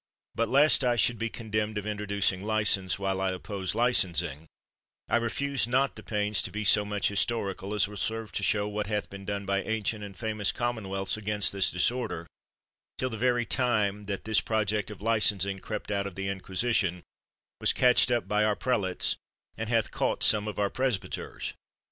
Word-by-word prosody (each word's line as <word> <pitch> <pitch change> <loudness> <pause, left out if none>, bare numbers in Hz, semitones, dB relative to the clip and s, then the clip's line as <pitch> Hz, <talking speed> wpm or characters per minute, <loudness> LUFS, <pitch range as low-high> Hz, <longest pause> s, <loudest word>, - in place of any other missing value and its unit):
But 115 -1 0
lest 145 +1 +5
I 120 -1 +3
should 120 +1 +2
be 115 0 -1
con 110 -2 -9
demned 110 0 0
of 105 - -3
introducing 100 -2 0
license, 105 -3 +1
while 95 -1 -1
I 95 -1 +1
oppose 95 +1 -4
licensing, 85 - +1 0.6
I - - +3
refuse 130 +3 0
not 130 +3 +2
the - - -9
pains 105 -1 0
to - - -1
be 105 +1 -3
so 105 +1 +5
much 105 -1 0
historical, 100 -1 -1
as 105 -1 +3
will 105 0 -9
serve 110 +2 -2
to - - -3
show 105 +1 +1
what 105 0 -3
hath 105 -1 -2
been 100 0 -9
done 100 0 -3
by 100 0 +1
ancient 110 0 -2
and 100 -2 -9
famous 110 -2 -1
commonwealths 100 -5 -1
against 105 -1 +1
this 100 -1 +1
disorder, 110 -2 -1 0.7
till 130 0 -2
the - - -3
very 120 +1 +1
time 105 -6 +1
that 100 -2 -3
this 110 -1 +2
project 110 -2 0
of 105 -2 -10
licensing 100 -3 +2
crept 105 +1 -5
out 100 -1 0
of 95 - -9
the 95 0 -3
inquisition, 95 -1 0 0.6
was - - +3
catched 125 0 +4
up 120 -1 0
by 105 0 +2
our 105 -1 +2
prelates, 100 -8 0 0.4
and 110 0 -4
hath 115 -2 +1
cought - - 0
some 105 -1 +3
of 105 - -5
our 100 -1 +1
presbyters. 130 -7 -2
105 Hz, 185 wpm, -28 LUFS, 100-115 Hz, 0.7 s, lest